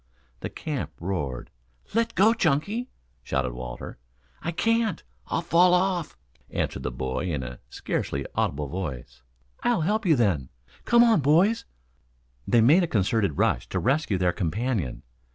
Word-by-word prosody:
The - - -4
camp 150 -4 -4
roared. 80 -8 -3 0.4
"Let 230 +1 +1
go, 215 +4 +5
Chunky!" 205 - 0 0.3
shouted 65 0 -1
Walter. 60 0 -7 0.4
"I - - -3
can't, 225 +4 +1 0.2
I'll 165 - -1
fall 175 +2 +5
off," 180 - 0 0.3
answered - - -2
the - - -2
boy 65 +7 -3
in 70 -5 -2
a 60 -1 -7
scarcely 70 +2 -3
audible 75 +1 -1
voice. 65 -8 -6 0.4
"I'll 240 -7 +2
help 210 +5 0
you 160 - +6
then. 90 - +1 0.4
Come 235 0 +6
on, 230 -6 +5
boys." 170 - +3 0.8
They 120 - +4
made 150 +11 +6
a 175 - +1
concerted 100 - +1
rush - - +1
to - - -2
rescue 135 -5 +1
their 90 -1 +1
companion. 100 - -2
120 Hz, 145 wpm, -26 LUFS, -, 0.8 s, you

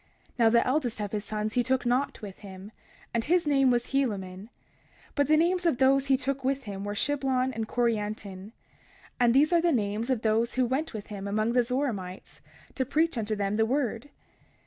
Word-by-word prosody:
31:7 - - -33
Now 230 -1 +6
the 235 +1 +3
eldest 255 -4 0
of 205 -1 -3
his 210 -1 -2
sons 215 0 -3
he 250 - +2
took 260 +1 0
not 250 0 0
with 195 -2 -8
him, 195 0 -10 0.4
and 230 -1 0
his 345 +4 +2
name 275 -3 +3
was 240 -1 0
Helaman; 200 -7 -2 0.6
but 285 -2 +1
the 310 - +4
names 350 +3 +2
of 320 - +2
those 270 +1 +3
whom 270 - +3
he 265 - +1
took 270 0 -2
with 270 +1 0
him 200 -3 -6
were 205 0 -4
Shiblon 260 0 0
and 220 -1 -3
Corianton; 210 -4 -2 0.7
and 240 -1 +4
these 300 +5 +4
are 340 - +5
the 340 0 +2
names 215 -1 -1
of 250 -4 0
those 225 +2 +1
who 255 -1 +2
went 265 +3 -2
with 210 - -6
him 200 0 -5
among 215 +3 0
the 250 - +4
Zoramites, 235 -7 -4 0.3
to 260 - -1
preach 315 +5 +1
unto 215 -2 -1
them 200 0 -1
the 220 - +3
word. 250 0 -1
240 Hz, 210 wpm, -28 LUFS, 210-270 Hz, 0.7 s, Now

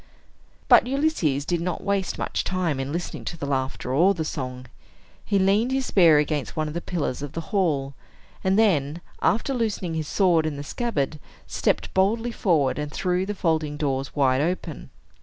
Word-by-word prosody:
But - - +6
Ulysses 255 - 0
did 170 +1 -1
not 180 +1 -3
waste 200 -1 -1
much - - -2
time 180 -7 -1
in 135 +1 -3
listening 170 +2 -4
to 165 - -5
the 145 - -4
laughter 130 -2 -2
or 180 +8 +4
the 160 -2 -2
song. 130 -3 -5 0.6
He 200 - +1
leaned 200 +6 +3
his 265 0 0
spear 170 -9 +5
against 150 0 -1
one 155 -1 -1
of 150 - -5
the 170 - -3
pillars 155 -9 -3
of 145 -1 -6
the - - -3
hall, 145 -9 +1 0.5
and 190 +1 +2
then, 165 -7 +2 0.2
after 230 +5 +1
loosening 215 -8 -1
his 160 -2 -3
sword 170 -4 +3
in 150 -2 -4
the 145 - -5
scabbard, 155 - -2 0.3
stepped - - -1
boldly 225 +5 +1
forward, 155 - +1
and 150 0 -4
threw 180 +3 -1
the 205 - -3
folding 155 -5 0
doors 135 -2 -2
wide 135 -2 +3
open. 165 -3 -3
165 Hz, 180 wpm, -24 LUFS, 145-195 Hz, 0.6 s, But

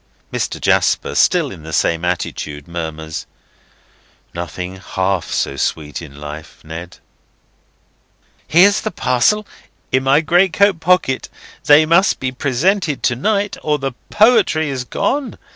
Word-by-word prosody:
Mr. - - -2
Jasper, - - +1
still - - +2
in - - -10
the 80 +1 -9
same 85 +1 +1
attitude, 75 -4 -3
murmurs: 80 -2 -6 1.1
"'Nothing 90 +2 -6
half 95 -1 -2
so 70 - -2
sweet 75 +2 -3
in 70 -3 -11
life,' 75 +1 -9
Ned!" 80 +3 -8 1.5
"Here's 195 +5 +5
the 215 - -2
parcel 175 - +1 0.5
in 130 - +2
my 135 +3 +3
greatcoat 180 +3 +3
pocket. 165 -6 +1 0.4
They 150 +2 +7
must 170 +5 +3
be 130 -1 -2
presented 150 +5 0
to 120 - +2
night, 205 - -1
or 150 -1 0
the 135 -1 -3 0.2
poetry 210 - +3
is 130 -2 -4
gone. 270 - -2
130 Hz, 125 wpm, -18 LUFS, -, 1.5 s, They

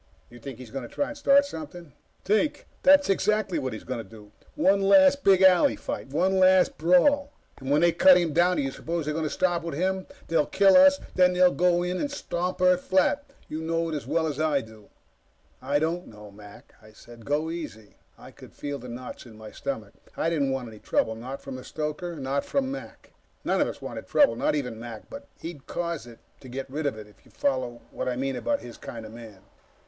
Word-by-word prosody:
"You 120 - -13
think 130 0 -8
he's 125 -3 -11
going 135 - -4
to 120 - -10
try 285 - -2
to 295 - -7
start 280 0 +4
something?" 160 - -9 0.3
"Think! 215 +9 +1 0.2
That's 285 +1 +6
exactly 195 -2 +1
what 130 -2 -3
he's 110 - -7
going 115 -5 -6
for. 105 -2 -14 0.2
One 280 -10 +3
last 280 +7 +5
big 190 -1 +5
alley 185 -2 +5
fight. - - -6
One 185 +7 +1
last 185 0 +5
brawl. 280 - +3 0.3
When 140 +3 +1
they 170 0 +5
cut 180 +2 +6
him 170 -4 0
down 175 +3 +3
do - - 0
you 135 - -2
suppose 165 +3 -4
they'll 155 +1 -2
stop 175 0 0
with 165 -3 -5
him? 190 +3 -1 0.2
They'll 165 -3 +1
kill 195 -1 +4
us, 280 +1 +7
and - - -15
then 180 0 +4
they'll 180 0 +5
go 175 0 +2
in 180 +1 -2
and 290 - -1
stamp 180 -10 -3
Earth 180 0 +4
flat! 190 +11 +2 0.2
You 155 +1 -5
know 165 +1 -1
it - - -4
as 145 - -6
well 165 0 +1
as 150 -2 -3
I 155 -3 +1
do." 110 -2 -15 0.7
"I 140 +3 0
don't 165 +4 -2
know, 105 -1 -13
Mac," 105 0 -15
I 110 0 -17
said. 115 +1 -15
"Go 150 +5 -1
easy." 150 -11 -8 0.2
I - - -13
could - - -15
feel 145 -1 -5
the 125 +1 -10
knots 125 +1 -8
in 110 -2 -14
my 110 -1 -10
stomach. 110 -7 -5 0.2
I 165 - 0
didn't 145 -5 +1
want 135 -2 -3
any 110 -2 -12
trouble. 110 - 0
Not 125 +5 -8
from 135 -1 -7
the 130 - -9
stoker, 155 +3 -4
not 140 -1 -2
from 270 -1 -1
Mac. 275 - -9 0.3
None - - +1
of - - +2
us - - -8
wanted - - -7
trouble 285 - +4
not - - 0
even 125 -6 -3
Mac, 115 -2 -9
but 280 0 -9
he'd 165 -5 -8
cause 170 -6 -4
it 115 -1 -13 0.2
to 130 - -13
get 135 +2 -5
rid 150 +1 -2
of 130 - -3
it, 105 - -9
if 105 -1 -22
you - - -21
follow 130 -3 -2
what - - -3
I 125 - -2
mean 135 +1 -2
about 285 - -1
his 120 - -10
kind 115 -2 -8
of 110 - -11
man. 110 -5 -12
155 Hz, 225 wpm, -26 LUFS, 125-185 Hz, 0.7 s, us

